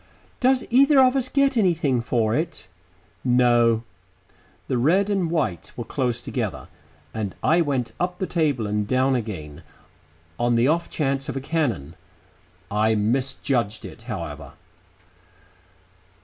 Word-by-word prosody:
"Does 260 0 +3
either 275 +3 +6
of 260 0 +5
us 260 -1 0
get 275 0 +2
anything 165 - +2
for 115 -2 0
it?" 160 - -3 0.6
"No." 120 -2 +3 0.8
The 125 - 0
red 190 +10 +3
and 190 -4 0
white 110 - -2
were - - -3
close 120 -2 -2
together, - - -4 0.4
and 105 -4 -4
I 170 +2 +4
went 135 -6 -1
up 180 0 -1
the 190 - -2
table 150 -10 0
and 105 0 -1
down 130 +2 +2
again, 95 - -4 0.8
on 120 0 +2
the 115 +2 +3
off 170 +3 +1
chance 135 -2 -1
of - - -3
a - - -1
cannon. 130 - -2 0.8
I 110 +2 +2
misjudged 120 0 -1
it, - - -10
however. 85 -7 -6
130 Hz, 135 wpm, -23 LUFS, 110-170 Hz, 0.8 s, either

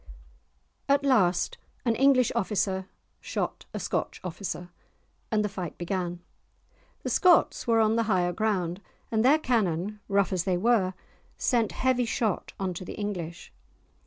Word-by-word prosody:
At 280 0 +3
last 190 -10 +2 0.3
an 230 -2 +2
English 260 -1 +4
officer 190 -1 0 0.3
shot - - -3
a - - -4
Scotch - - -2
officer, 180 0 -5 0.6
and 210 -1 +1
the - - +1
fight 185 -5 -6
began. 175 -1 -3 0.8
The - - -2
Scots 360 -8 +4
were 230 -1 +4
on 220 0 +3
the 230 - +3
higher 175 -3 +2
ground, 190 -4 -1 0.3
and 220 -1 +2
their 280 +5 +6
cannon, 210 - 0
rough 200 -1 +2
as 180 -2 0
they 185 -2 +1
were, 190 -3 +2 0.4
sent 235 -4 +1
heavy 255 -1 +1
shot 220 -3 -1
on 190 -2 -1
to 175 - -6
the - - -7
English. 180 -5 -5
200 Hz, 145 wpm, -27 LUFS, 180-230 Hz, 0.8 s, their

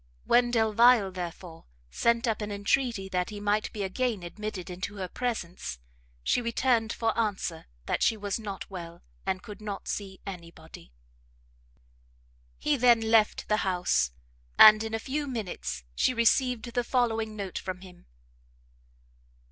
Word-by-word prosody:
When 240 0 +4
Delvile, 225 -2 +4
therefore, 175 -2 -7 0.3
sent 235 - +2
up 220 -1 0
an 210 0 -4
entreaty 205 0 0
that 180 -1 -1
he 210 -1 -7
might 205 +1 0
be 210 - -4
again 215 0 -1
admitted 195 0 -6
into 185 +3 -5
her 190 -2 -4
presence, 180 - -4 0.5
she 245 - +2
returned 235 -1 +1
for 225 -1 -1
answer 200 -7 -2 0.2
that - - -1
she 225 - +3
was 205 0 -3
not 205 -3 -6
well, 170 -2 -8 0.2
and 185 -1 -1
could 210 0 -10
not 205 -2 -6
see 195 -2 -4
any 180 -4 -7
body. 160 - -14 1.7
He 300 -1 +1
then 235 -3 +4
left 220 -2 +3
the 210 - +2
house, 180 - +1 0.5
and, 215 0 +9
in 220 0 -3
a - - -2
few 290 +2 -2
minutes, 210 - -4
she 255 - +1
received 240 +1 +2
the 245 - +1
following 225 -3 0
note 195 -3 -4
from 185 -1 -6
him. 180 -2 -14
210 Hz, 150 wpm, -28 LUFS, 185-230 Hz, 1.7 s, and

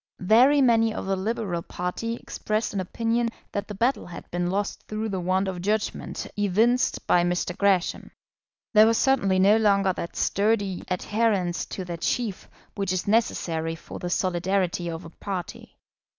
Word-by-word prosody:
Very 250 +9 +5
many 225 -2 +4
of - - -4
the 195 0 0
Liberal 190 -3 -2
party 180 +8 -4
expressed 215 -2 -3
an 200 - -1
opinion 230 +5 0 0.2
that 200 - -3
the 210 - -7
battle 235 +1 0
had 175 - -9
been 175 0 -1
lost 200 +2 -2
through 215 +1 -3
the 190 -2 -2
want 185 +2 0
of 185 -2 -4
judgment 210 +3 -2
evinced 215 +5 +2
by 175 - +4
Mr. 175 0 -1
Gresham. 195 -3 +1 0.6
There 215 0 +7
was 230 0 +3
certainly 225 -9 +2
no 200 +3 +5
longer 200 -3 +3
that 170 - -6
sturdy 200 -2 0
adherence 190 -1 0
to 190 - -6
their 170 -1 -5
chief 210 +3 -2 0.2
which 195 -3 -2
is 185 +1 -2
necessary 165 -7 0
for - - -10
the 175 - -4
solidarity 180 -1 0
of 165 +1 -6
a 165 - -10
party. 185 -1 -6
195 Hz, 165 wpm, -25 LUFS, 180-220 Hz, 0.6 s, There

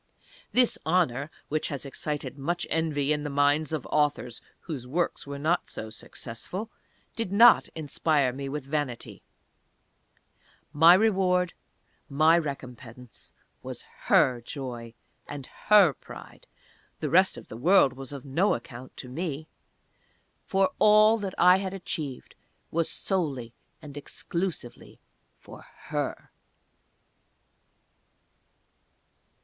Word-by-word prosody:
This 250 -1 +4
honour 155 -5 +1 0.2
(which 155 +1 -1
has 140 -2 -5
excited 145 +2 -4
much 170 +5 -2
envy 150 -3 0
in 150 - -2
the 145 - -4
minds 145 +2 +2
of 155 -5 -3
authors 145 -6 0 0.2
whose 140 -7 -6
works 165 +2 -2
were 140 0 -5
not 160 +5 0
so 110 0 -7
successful), 175 - -7 0.4
did 225 -5 -3
not 230 +4 +6
inspire 150 -3 0
me 135 +1 -5
with 145 -1 -5
vanity. 140 -4 -4 1.5
My 165 +4 +8
reward 185 -4 +2 0.6
my 155 +4 +4
recompense 125 -6 -6 0.3
was - - -7 0.2
Her 125 -2 +4
joy, 120 -4 -7 0.3
and 145 -2 -7 0.2
Her 200 -8 +7
pride: - - -13 0.5
the - - -3
rest - - +4
of - - -11
the - - -9
world 145 - +4
was 135 +1 -8
of 140 -1 -8
no 165 +10 +2
account 120 +2 -10
to 130 - -8
me; 155 +2 -5 0.9
for 195 0 +1
all 215 +1 +6
that 195 -3 -5
I 180 +1 +6
had 190 0 -4
achieved 150 -8 -6 0.4
was 165 0 0
solely 140 - -1 0.3
and 145 -2 -10
exclusively 165 -1 -5 0.4
for - - -13 0.3
Her. - - -3
150 Hz, 115 wpm, -27 LUFS, 135-180 Hz, 1.5 s, My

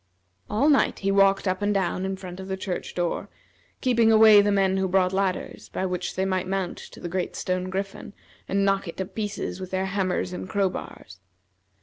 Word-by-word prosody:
All 225 +8 +2
night 290 -3 +3
he 195 - +3
walked 195 0 +4
up 185 +1 0
and 205 0 +1
down 190 -1 0
in 190 0 -3
front 185 -1 -8
of 190 - -7
the 190 0 -3
church 185 -1 -5
door, 175 -1 -2 0.5
keeping 235 -3 +4
away 215 -1 +8
the 205 0 +1
men 195 -1 +2
who 190 0 +1
brought 185 0 +2
ladders, 190 -1 -2
by 190 - -2
which 180 -1 -3
they 190 - 0
might 185 -1 -1
mount 190 -2 -2
to - - -12
the - - -5
great 180 +1 -3
stone 185 0 -2
griffin, 195 +1 -5 0.3
and 195 0 +1
knock 195 -1 +1
it 170 - -7
to 190 - -2
pieces 200 -1 -4
with 185 -1 -6
their 190 0 -1
hammers 185 -2 -1
and 185 - -6
crowbars. 185 - -3
190 Hz, 205 wpm, -25 LUFS, 185-200 Hz, 0.5 s, away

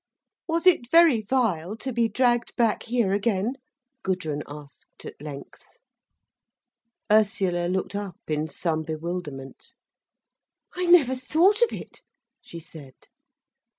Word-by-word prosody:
"Was 335 +1 -1
it 325 -10 +4
very 330 -7 +6
vile 210 -5 -1
to 260 +2 -5
be 230 -1 +1
dragged 240 +1 +1
back 230 -3 +1
here 235 -5 0
again?" 205 +2 0 0.5
Gudrun 170 - -2
asked 145 -1 -13
at - - -10
length. 145 -2 -9 1.5
Ursula 200 -5 +2
looked 185 +2 -2
up 200 -3 -5
in 155 0 -1
some 160 +1 -2
bewilderment. 155 -4 -6 1.0
"I 360 0 -2
never 320 -8 +6
thought 330 - +2
of 475 - +4
it," - - -9 0.4
she 170 - -10
said. 150 -5 -13
200 Hz, 120 wpm, -25 LUFS, 160-250 Hz, 1.5 s, very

